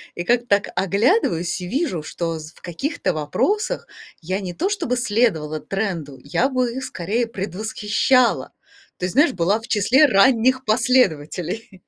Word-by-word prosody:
И 175 - -4
как-то 240 +3 +1
так 200 0 +2
оглядываюсь 195 - +1
и 180 - -5
вижу, 260 - -1
что 165 +1 -4
з 155 0 -10
в - - -22
каких-то 185 - -3
вопросах 405 - -1 0.3
я 185 +4 -2
не 180 -3 -5
то 360 - -1
чтобы 250 -12 -1
следовала 205 -10 0
тренду, 170 -10 -4
я 195 - 0
бы 255 -2 0
их 265 - -5
скорее 220 +6 -2
предвосхищала. 215 +5 0 0.5
То 180 - -3
есть, 180 - -3
знаешь, 285 +2 +4
была 195 +4 +1
в 230 - -12
числе 235 +8 +4
ранних 255 +4 +3
последователей. 195 - 0
205 Hz, 150 wpm, -21 LUFS, 175-250 Hz, 0.5 s, знаешь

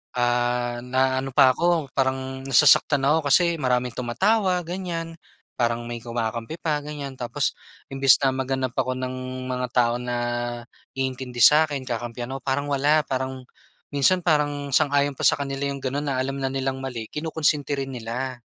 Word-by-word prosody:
ah, 120 0 0
naaano 130 +1 0
pa 130 - +7
ako, 165 -2 0
parang 130 0 -1
nasasaktan 135 +1 +5
ako 150 +1 +2
kasi 170 +2 +3
maraming 125 -2 0
tumatawa, 185 - +1
ganyan. 165 -2 -5 0.4
Parang 120 -1 -1
may 120 -1 -6
kumakampi 115 +5 -4
pa 150 -3 -1
ganyan. 145 -3 -6
Tapos 130 +3 -2 0.3
imbes 135 -2 +4
na 135 - +2
maghanap 130 -1 -2
ako 130 -1 0
ng 130 0 -5
mga 125 0 -2
tao 120 -1 +2
na 125 0 -3 0.8
iintindi 130 -2 -3
sa'kin, 145 0 +5
kakampihan 120 0 -4
ako, 135 - -6
parang 140 +1 -1
wala. 145 +2 +3
Parang 130 -1 -4 0.4
minsan 145 +6 +2
parang 145 -4 0
sang-ayon 145 -2 +2
pa - - -7
sa - - +4
kanila 135 0 -3
yung 140 - -5
gano'n 140 +2 -2
na 130 - -1
alam 135 +1 -2
na 135 - 0
nilang 135 0 -3
mali, 120 -4 -5
kinukunsinti 150 -2 -1
rin 135 - -3
nila. 120 +2 -5
135 Hz, 155 wpm, -24 LUFS, 125-145 Hz, 0.8 s, pa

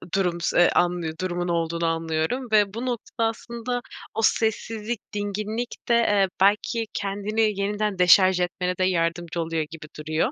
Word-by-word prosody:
durum 180 -3 0
s 175 0 +4
anlı 175 -2 +1
durumun 175 -1 -2
olduğunu 170 0 -1
anlıyorum 165 +9 -1
ve 210 -2 +4
bu 235 +3 -4
notada 240 -3 -2 0.3
aslında 235 +2 -4 0.3
o 225 - -1
sessizlik, 225 0 0
dinginlikte, 210 +4 -3
eee, 205 -4 +3
belki 210 +3 +2
kendini 205 +1 -1
yeniden 205 -1 -1
deşarj 185 +1 +6
etmene 180 0 -1
de 185 - +1
yardımcı 170 -1 0
oluyor 165 -1 -1
gibi 155 -1 -9
duruyor. 155 +1 0
195 Hz, 140 wpm, -24 LUFS, 170-215 Hz, 0.3 s, deşarj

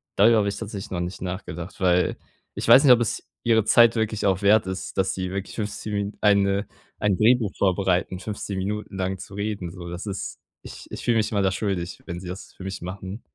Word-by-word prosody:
darüber 110 +3 +6
habe 100 -1 +2
ich 100 - -4
tatsächlich 105 -1 -6
noch 90 - -2
nicht 90 +1 -4
nachgedacht, 90 -1 -6
weil 90 -1 +2 0.4
ich - - -4
weiß 135 - +8
nicht, 135 -4 +9
ob 120 - +3
es 115 - -2 0.2
ihre 115 -3 +3
Zeit 115 +1 +6
wirklich 110 -2 -1
auch 95 +1 +1
wert 105 0 +5
ist, 95 0 -5
dass 95 - +1
sie 95 -1 -3
wirklich 100 0 -5
15 105 0 -4
Min 100 0 -2
eine 100 -1 +3 0.3
ein 105 -3 +2
Drehbuch 110 -1 +4
vorbereiten, 95 -1 +1
15 100 0 -5
Minuten 105 +1 -4
lang 95 0 -1
zu 95 - -11
reden 100 -3 -3
so. 85 -1 -8
Das 85 +3 -6
ist 100 -2 -5 0.2
ich - - -10
ich - - -6
fühl 120 - +2
mich 110 -1 +1
immer 100 -2 +1
da 95 -1 +2
schuldig, 95 -3 -3
wenn 85 0 -5
sie 90 - -9
das 90 +2 -8
für - - -11
mich 95 0 -5
machen. 95 +4 -6
100 Hz, 220 wpm, -24 LUFS, 95-105 Hz, 0.4 s, nicht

